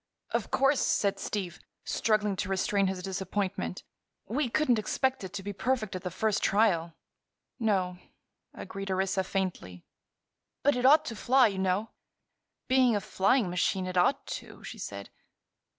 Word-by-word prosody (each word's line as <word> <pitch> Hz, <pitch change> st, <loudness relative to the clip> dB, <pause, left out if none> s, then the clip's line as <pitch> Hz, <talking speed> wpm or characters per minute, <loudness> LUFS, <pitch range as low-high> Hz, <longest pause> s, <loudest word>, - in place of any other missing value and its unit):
"Of -, -, -1 dB
course," 275 Hz, +1 st, +3 dB
said 285 Hz, -11 st, +1 dB
Steve, 185 Hz, -5 st, -4 dB, 0.3 s
struggling 210 Hz, -2 st, +1 dB
to 200 Hz, 0 st, -2 dB
restrain 195 Hz, +1 st, +1 dB
his 185 Hz, -1 st, -3 dB
disappointment, 190 Hz, -, -3 dB, 0.4 s
"we 250 Hz, +4 st, -1 dB
couldn't 250 Hz, -3 st, +2 dB
expect 260 Hz, +3 st, -1 dB
it 190 Hz, -, -6 dB
to 200 Hz, -1 st, -5 dB
be 205 Hz, +1 st, -4 dB
perfect 225 Hz, -2 st, -1 dB
at 185 Hz, -, -4 dB
the 180 Hz, -, -3 dB
first 210 Hz, +4 st, 0 dB
trial." 175 Hz, -6 st, +2 dB, 0.6 s
"No," 190 Hz, -5 st, 0 dB, 0.5 s
agreed 195 Hz, 0 st, -7 dB
Orissa, 190 Hz, 0 st, 0 dB
faintly. 180 Hz, -, -4 dB, 0.8 s
"But 285 Hz, -1 st, +4 dB
it 250 Hz, +1 st, +3 dB
ought 300 Hz, +3 st, +6 dB
to 230 Hz, -, -5 dB
fly, 250 Hz, +2 st, +4 dB
you 195 Hz, -2 st, -5 dB
know." 190 Hz, +3 st, 0 dB, 0.8 s
"Being 255 Hz, -3 st, +4 dB
a -, -, +2 dB
flying 200 Hz, +4 st, +2 dB
machine, 185 Hz, +1 st, 0 dB
it 185 Hz, 0 st, -5 dB
ought 180 Hz, +10 st, +2 dB
to," -, -, -8 dB
she -, -, -8 dB
said. -, -, -7 dB
200 Hz, 150 wpm, -29 LUFS, 185-235 Hz, 0.8 s, ought